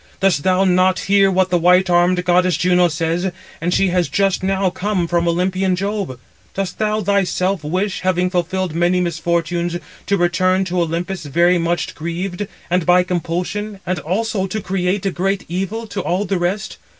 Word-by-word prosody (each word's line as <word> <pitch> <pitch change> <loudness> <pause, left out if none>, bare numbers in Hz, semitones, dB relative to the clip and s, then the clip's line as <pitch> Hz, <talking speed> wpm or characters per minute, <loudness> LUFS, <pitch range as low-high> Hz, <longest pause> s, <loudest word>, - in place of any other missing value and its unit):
Dost 190 -6 +2
thou 185 +3 +2
not 185 -1 +3
hear 195 0 +4
what 185 -1 +1
the 175 - +3
white 180 +2 +4
armed 180 +1 +2
goddess 180 -2 +3
Juno 180 0 +3
says, 165 +3 -1 0.3
and 175 +2 0
she 190 +1 +2
has 180 -1 +1
just 195 -1 +1
now 190 0 0
come 190 -1 -1
from 170 0 0
Olympian 185 +2 +1
Jove? 195 - -3 0.4
Dost 195 -1 -3
thou 215 0 0
thyself 195 -2 0
wish, 185 +6 -1
having 180 0 +1
fulfilled 185 -1 -1
many 175 +2 +2
misfortunes, 170 0 -1 0.3
to 200 - +2
return 185 +2 +2
to 180 -1 -1
Olympus 170 +1 -3
very 175 +5 +3
much 170 0 -1
grieved, 175 +4 -4 0.2
and 180 0 +1
by 180 +1 +4
compulsion, 180 +4 -3
and 185 0 -1
also 195 +3 -1
to 215 +3 -3
create 190 0 -1
a 195 - +1
great 195 +2 -1
evil 195 +6 -3
to 205 -2 -4
all 180 +3 -1
the 190 -1 -1
rest? 190 +4 -2
180 Hz, 175 wpm, -19 LUFS, 175-195 Hz, 0.4 s, hear